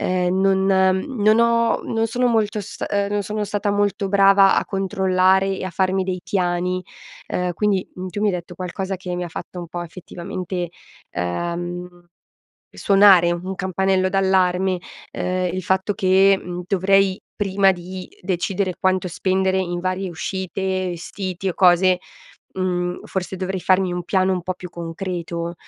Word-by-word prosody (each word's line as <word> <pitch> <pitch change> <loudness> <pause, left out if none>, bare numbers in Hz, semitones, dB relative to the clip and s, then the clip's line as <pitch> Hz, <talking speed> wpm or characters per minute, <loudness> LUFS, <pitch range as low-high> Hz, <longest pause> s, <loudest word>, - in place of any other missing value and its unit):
Uhm, 185 +1 +1
non 190 0 +3
non 195 +4 +3
ho 235 0 +4 0.2
non 225 0 -1
sono 245 +2 0
molto 220 -3 +1
st 200 - -6
uhm, 200 -1 +1
non 205 0 0
sono 210 +2 -3
stata 205 0 -1
molto 205 0 0
brava 195 0 +5
a - - +2
controllare 190 -1 +2
e - - -5
a 185 - -4
farmi 190 +1 0
dei 185 -1 -3
piani. 180 -1 -1 0.5
Uhm, 180 -1 -1
quindi, 200 -2 0
mhmm, 185 0 -6
tu 205 - -5
mi 215 - +2
hai 185 - 0
detto 175 0 -6
qualcosa 190 +2 -4
che 180 -1 -5
mi 180 - -3
fatto 180 +2 -8
un 170 -2 -6
po' 175 - -5
effettivamente, 175 +1 -5 0.4
uhm, 175 - -3 0.8
suonare 195 -4 +5
un 185 +2 -4
campanello 190 0 +1
d'allarme, 190 -1 +2 0.4
uhm, 185 0 -1
il 185 0 -3
fatto 190 +3 +1
che, 195 0 +4
mhmm, 180 0 -5
dovrei 195 0 +2 0.2
prima 195 -1 +3
di 185 +1 -8
decidere 185 +1 -1
quanto 185 -1 +1
spendere 190 +2 0
in 175 -1 -2
varie 185 +1 -2
uscite, 190 +3 -4 0.3
vestiti, 185 +2 -4
o 180 - -2
cose, 180 0 +4 0.6
mhmm, 180 -1 -1
forse 190 0 -4
dovrei 190 0 -3
farmi 185 -1 +2
un 175 0 -3
piano 190 0 +2
un 180 -2 -2
po' 185 +1 -3
più 180 -1 -10
concreto. 170 0 -5
185 Hz, 155 wpm, -21 LUFS, 180-195 Hz, 0.8 s, brava